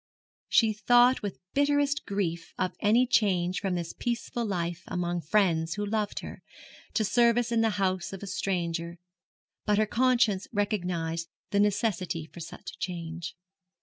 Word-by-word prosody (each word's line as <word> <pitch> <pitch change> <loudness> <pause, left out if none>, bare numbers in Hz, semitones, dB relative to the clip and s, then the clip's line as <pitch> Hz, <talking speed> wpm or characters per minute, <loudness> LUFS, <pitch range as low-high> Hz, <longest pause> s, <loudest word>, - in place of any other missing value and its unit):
She 225 -2 +4
thought 245 +4 +4
with 205 -3 -4 0.2
bitterest 285 0 +2
grief 175 -4 -2
of 185 -1 -1
any 230 +4 +4
change 190 -6 +2
from 190 -2 -1
this 170 -1 -4
peaceful 240 0 -3
life 175 -5 -2
among 175 -1 -2
friends 165 -2 +2
who 205 0 -2
loved 210 0 -1
her, - - -9 0.5
to 215 - +2
service 235 +2 +3
in 230 -1 +3
the 225 - +3
house 185 -2 0
of 195 0 -7
a - - -3
stranger; 170 -3 -2 0.7
but 210 -1 +2
her 215 - +4
conscience 235 -4 +2
recognised 180 -6 -1 0.2
the 200 - +2
necessity 200 -5 0
for 170 - -13
such 165 0 -8
a - - -17
change. 170 -1 -5
200 Hz, 150 wpm, -28 LUFS, 175-225 Hz, 0.7 s, She